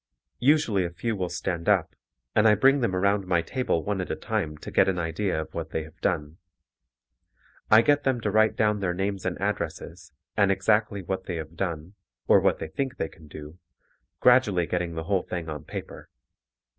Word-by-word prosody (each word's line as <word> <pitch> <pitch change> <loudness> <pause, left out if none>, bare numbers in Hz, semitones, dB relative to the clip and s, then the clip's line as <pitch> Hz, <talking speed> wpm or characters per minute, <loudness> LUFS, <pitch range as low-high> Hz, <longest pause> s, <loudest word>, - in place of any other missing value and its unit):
Usually 125 -8 +3
a 85 - -2
few 110 +6 -3
will 90 -3 -2
stand 85 -1 -3
up, - - +2 0.4
and 110 - +5
I 105 - +6
bring 135 +7 +4
them 115 -7 0
around 100 +1 +1
my 85 -2 +2
table 125 -5 -1
one 100 -2 -2
at 90 - -5
a - - -1
time 75 -1 -3
to - - -9
get - - +4
an 95 - -1
idea 85 +1 -1
of 80 - -6
what - - -4
they 80 - -3
have 80 0 -15
done. 75 +3 -2 1.3
I 110 +1 +7
get 145 +1 +3
them 130 -2 +1
to 105 - -1
write 110 +1 +3
down 105 -1 +1
their 90 -3 -1
names 95 0 -2
and 90 - -3
addresses 105 +1 -4 0.2
and 100 -1 +3
exactly 100 +1 +1
what 95 +2 -4
they 90 - -4
have 80 0 -7
done 85 -1 -4 0.3
or - - +6
what - - +2
they 80 - -6
think 130 +9 -3
they 80 - -2
can 80 -2 -17
do, 75 +3 -10 0.6
gradually 120 -9 +4
getting 85 -1 -2
the 80 - -3
whole 95 +2 +1
thing 85 -2 -5
on 75 -2 -6
paper. - - -8
95 Hz, 200 wpm, -26 LUFS, 85-105 Hz, 1.3 s, I